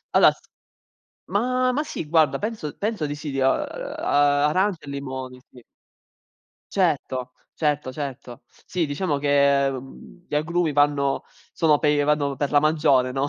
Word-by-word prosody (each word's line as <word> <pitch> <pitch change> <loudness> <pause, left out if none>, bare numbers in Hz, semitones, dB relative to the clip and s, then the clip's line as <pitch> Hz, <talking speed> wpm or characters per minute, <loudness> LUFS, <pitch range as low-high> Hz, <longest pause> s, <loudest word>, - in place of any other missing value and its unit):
allora - - +6 1.0
ma 255 +4 +1
ma 290 +4 0
sì 165 - -6
guarda, 155 -1 +3
penso 210 -9 -4
penso 210 -7 -2
di 145 - -4
sì, 150 0 -6
di, 135 - -4
uhm, 130 - +3
ar - - -4 0.5
arancia 185 +1 0
e - - -10
limoni, 130 -2 -6
sì. 125 -2 -16 1.1
Certo, 135 -8 0 0.2
certo, 150 -4 -1
certo. 130 -4 -7 0.2
Sì 175 -3 -1
diciamo 145 +1 -1
che, 140 -1 +3
mhmm, 135 +6 -10
gli - - -4
agrumi 165 +1 0
vanno 145 -1 +1 0.3
sono 155 -3 +3
per 150 -1 +2
vanno 145 -2 +1
per 145 +1 -1
la 145 - +4
maggiore, 145 -5 +2
no, 135 +2 -1
145 Hz, 150 wpm, -23 LUFS, 140-165 Hz, 1.1 s, allora